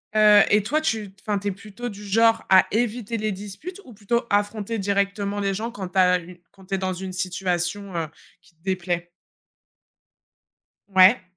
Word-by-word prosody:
Heu 210 -1 +7
et 210 - +5
toi, 300 +9 +1
tu, 220 -10 -2
enfin, 205 -2 -1
tu 205 - -5
es 200 - +1
plutôt 210 +5 -7
du 205 0 -10
genre 225 +3 +3
à 190 -1 +7
éviter 230 0 -1
les 215 0 -1
disputes 210 - -8
ou 245 - -13
plutôt 235 +4 -1
affronter 205 +2 0
directement 200 0 -1
les 195 -1 0
gens 230 +4 -3
quand 190 -6 -6
tu 190 - -6
as 180 -1 +5
eu 175 +1 -13
quand 190 -1 -18
tu 195 - -2
es - - -1
dans 185 0 -2
une 185 +1 -6
situation, 185 +1 -2
heu, 165 -2 -1 0.3
qui - - -24
te 160 - -39
déplaît? 175 -2 -2 1.8
Ouais. 190 +1 +6
200 Hz, 185 wpm, -24 LUFS, 185-215 Hz, 1.8 s, Heu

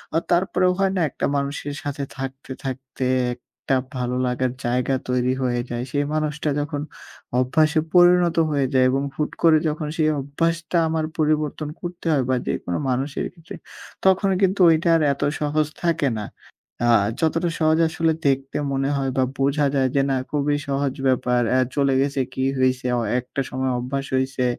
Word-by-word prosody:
আ - - +5
তারপরেও 180 +1 +2
হয় 195 -1 +2
না 185 - +1
একটা - - -3
মানুষের 140 +1 -3
সাথে 145 -1 -3
থাকতে, 135 0 -6
থাকতে 130 0 -5 0.3
একটা 125 +2 -4 0.2
ভালো 125 0 -2
লাগার 125 0 0
জায়গা 125 +2 0 0.2
তৈরি 125 0 +1
হয়ে 120 -1 0
যায়। 120 0 -3
সেই 145 0 0
মানুষটা 150 0 -1
যখন 145 0 -3 0.6
অভ্যাসে 155 +5 +2
পরিণত 175 -1 +5
হয়ে 140 -2 +1
যায় 130 -1 +4
এবং 135 +1 0
হুট 150 - -2
করে 165 -2 +7
যখন 150 0 -3
সেই 155 -2 +3
অভ্যাসটা 165 +5 -1
আমার 160 0 -1
পরিবর্তন 155 -1 0
করতে 175 -1 -7
হয় 140 -4 +2
বা 130 - +3
যেকোনো 90 - -2
মানুষের 135 +3 -1
ক্ষেত্রে, 165 -2 -11 0.5
তখন 190 +1 +4
কিন্তু 195 0 +2
ওইটা 165 +1 +3
আর 165 - +2
এত 140 - -11 0.2
সহজ 150 0 +1 0.2
থাকে 165 -5 +1
না। 105 - -5 0.6
আ - - +3 0.3
যতটা 165 +2 +1
সহজ 155 0 +3
আসলে 165 -1 +1
দেখতে 135 0 0 0.2
মনে 135 0 0
হয় 135 -1 -1
বা 130 - +4 0.2
বোঝা 140 +2 +2
যায় 130 -1 +2
যে 140 - +4
না, - - +2 0.2
খুবই 145 0 +1
সহজ 140 -1 0
ব্যাপার 125 -1 +2
অ্যা 130 +1 +4
চলে 140 -1 +2
গেছে 140 0 0
কি 130 - -2 0.2
হইছে? 130 0 +1
অ - - 0 0.2
একটা 125 +2 -4
সময় 130 0 -1
অভ্যাস 135 +3 -3
হইছে, 130 -1 0
140 Hz, 170 wpm, -22 LUFS, 130-160 Hz, 0.6 s, করে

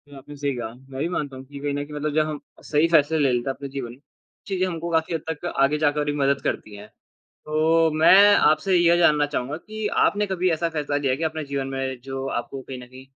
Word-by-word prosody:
आपने 145 +2 -11
सही 140 0 -2
कहा, 115 -2 -5
मैं 130 +1 -11
भी 160 - 0
मानता 145 -6 -3
हूँ 130 - -10
कि 140 +1 -10
कही 145 0 -2
न 145 - -2
कही 150 - -12
मतलब 150 0 -3
जब 155 0 +2
हम 150 -1 -4 0.2
सही 155 +2 +2
फ़ैसला 160 -1 +3
ले 140 -4 +3
लेते 120 +2 -1
है - - 0
अपने 140 - -7
जीवन 135 -3 -5
में, 125 - -17 0.5
चीज़ें 190 -2 0
हमको 170 -1 -4
काफ़ी 160 +1 0
हद 160 - -3
तक 160 +1 -5 0.2
आगे 145 +2 +2
जाकर 150 -1 +1
भी 145 - 0
मदद 140 0 +1
करती 105 - -3
हैं। 105 +1 -11 0.6
तो 160 +2 +2
मैं 195 +6 +7
आपसे 180 +2 +3
यह 170 0 +4
जानना 150 -4 +4
चाहूँगा 145 0 -3
कि 215 +5 -6 0.2
आपने 205 0 +1
कभी 185 -2 0
ऐसा 165 +1 0
फ़ैसला 150 -3 -2
लिया 140 -3 0
है - - 0
कि 160 - -3
अपने 160 -1 -3
जीवन 140 -1 -3
में 130 -1 -3
जो 135 0 -5
आपको 135 +2 -4
कहीं 130 -1 -8
न 125 - -11
कहीं 130 +1 -14
145 Hz, 250 wpm, -23 LUFS, 135-160 Hz, 0.6 s, मैं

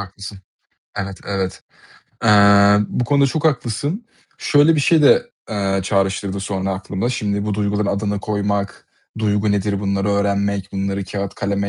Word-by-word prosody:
haklısın. 100 +1 -9 0.6
Evet, 100 -1 -4
evet. 95 -2 -3 0.6
Eee, 100 -1 +6
bu 125 - -1
konuda 140 +2 +3
çok 150 +3 -3
haklısın. 145 - -1 0.3
Şöyle 150 +2 +4
bir 150 - +1
şey 155 +2 +3
de, - - +4 0.2
eee, 100 -2 0
çağrıştırdı 95 0 -1
sonra 95 0 -3
aklımda. 95 +3 -3
Şimdi 105 -4 -2
bu 105 -1 -1
duyguların 105 0 -1
adını 100 0 -1
koymak, 100 -1 -2 0.3
duygu 105 -1 +1
nedir 100 0 -1
bunları 100 0 -1
öğrenmek, 100 -1 -1
bunları 100 0 -2
kâğıt 100 0 -5
kaleme 100 0 -2
100 Hz, 145 wpm, -19 LUFS, 100-105 Hz, 0.6 s, Eee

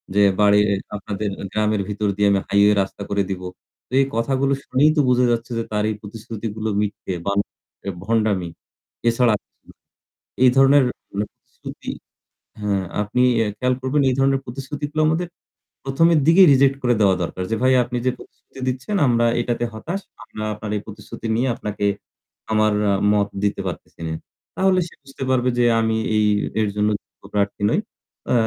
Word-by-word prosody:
যে 105 - +5 0.2
বাড়ির 105 0 +5 0.3
আপনাদের 100 +1 -3 0.2
গ্রামের 105 -1 +1
ভিতর 105 0 -1
দিয়ে 105 0 +3
আমি 100 - +3
হাইওয়ে 100 +1 +4
রাস্তা 95 +1 -5
করে 100 -1 +1
দিবো। 90 -1 -4 0.4
তো - - -56
এই 135 - +4
কথাগুলো 135 +4 +1
শুনেই 140 +4 +3
তো - - +6
বুঝা 125 0 +4
যাচ্ছে 120 +1 -2
যে 115 - -1
তার 105 0 0
এই 110 - -2
প্রতিশ্রুতিগুলো 110 0 -5
মিথ্যে 100 -2 -3
বা 100 - +1
হচ্ছে 100 - -8 0.2
ভণ্ডামি। 105 -6 +1 0.6
এছাড়া, 115 -1 +3 1.1
এই 125 - +8
ধরনের 135 +1 +6 0.3
মানে 105 +1 -1
প্রতিশ্রুতি - - -9 0.7
হা 105 -1 0 0.3
আপনি 115 +5 0 0.2
এ - - +2
খেয়াল 125 +1 +1
করবেন, 140 +2 +1
এই - - +1
ধরনের 135 0 +3
প্রতিশ্রুতিগুলো 145 +4 -4
আমাদের 165 +3 0 0.6
প্রথমের 160 +4 +3
দিকেই 180 +3 +8
রিজেক্ট 135 0 +4
করে 120 -1 +3
দেওয়া 95 -2 +5
দরকার 90 +2 -4
যে, 115 - +2
ভাই 130 - +5
আপনি 120 +1 -4
যে 130 - +3
প্রতিশ্রুতি - - -16
দিচ্ছেন, 130 +10 -2
আমরা 120 -1 +3
এইটাতে 120 0 -1
হতাশ। 170 - -4 0.2
আমরা 110 - -6
আপনার 105 0 -6
এই - - -4
প্রতিশ্রুতি 110 +1 -8
নিয়ে 125 +3 +1
আপনাকে 105 -1 -3 0.7
আমার 110 -1 +3 0.4
মত 100 -1 +2 0.2
দিতে 100 -1 0
পারতেছি 90 - -8
নে। 80 - -3 0.4
তাহলে 190 -1 +3
সে - - -17
বুঝতে 135 -1 -8
পারবে 125 -1 +2
যে 120 - +4 0.2
আমি 110 0 +1 0.2
এই 105 0 +3 0.4
এর 105 - +1
জন্য 105 0 +2
যোগ্য - - -26
প্রার্থী 100 0 -1
নই। - - +2 0.5
আ - - +4
115 Hz, 165 wpm, -21 LUFS, 105-130 Hz, 1.1 s, এই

